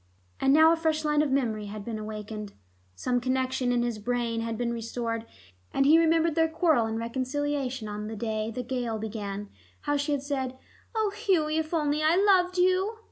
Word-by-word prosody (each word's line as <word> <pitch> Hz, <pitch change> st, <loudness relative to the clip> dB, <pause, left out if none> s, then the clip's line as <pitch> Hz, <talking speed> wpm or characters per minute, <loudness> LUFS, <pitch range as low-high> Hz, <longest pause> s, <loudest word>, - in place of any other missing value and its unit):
But -, -, -1 dB
now 315 Hz, +4 st, +7 dB
a -, -, +3 dB
fresh 315 Hz, -1 st, 0 dB
line 300 Hz, 0 st, +3 dB
of 300 Hz, -, +1 dB
memory 225 Hz, -6 st, 0 dB
had 205 Hz, 0 st, -7 dB
been 225 Hz, -2 st, -4 dB
awakened: 215 Hz, -1 st, -6 dB, 0.4 s
some 245 Hz, -, 0 dB
connection 260 Hz, 0 st, 0 dB
in 240 Hz, -1 st, +2 dB
his 235 Hz, -3 st, -2 dB
brain 235 Hz, 0 st, -1 dB
had 230 Hz, -1 st, -3 dB
been 235 Hz, 0 st, -1 dB
restored, 230 Hz, 0 st, -3 dB, 0.4 s
and 275 Hz, -, +2 dB
he 315 Hz, +3 st, +7 dB
remembered 330 Hz, 0 st, +3 dB
their 325 Hz, 0 st, +2 dB
quarrel 320 Hz, -8 st, +2 dB
and 220 Hz, 0 st, -3 dB
reconciliation 260 Hz, +1 st, -2 dB
on 210 Hz, 0 st, -5 dB
the 220 Hz, -, -5 dB
day 220 Hz, 0 st, -2 dB
the 250 Hz, +2 st, -4 dB
gale 245 Hz, -3 st, -2 dB
began; 205 Hz, -2 st, -5 dB, 0.3 s
how 290 Hz, 0 st, 0 dB
she 285 Hz, +1 st, -1 dB
had 275 Hz, -1 st, -1 dB
said, 265 Hz, -3 st, -3 dB, 0.4 s
"Oh, 435 Hz, -2 st, +1 dB
Hughie, 330 Hz, -8 st, +1 dB
if 315 Hz, 0 st, -3 dB
only 300 Hz, -2 st, +1 dB
I 310 Hz, +2 st, +4 dB
loved 370 Hz, -2 st, +4 dB
you!" 370 Hz, +4 st, +2 dB
260 Hz, 190 wpm, -28 LUFS, 225-315 Hz, 0.4 s, now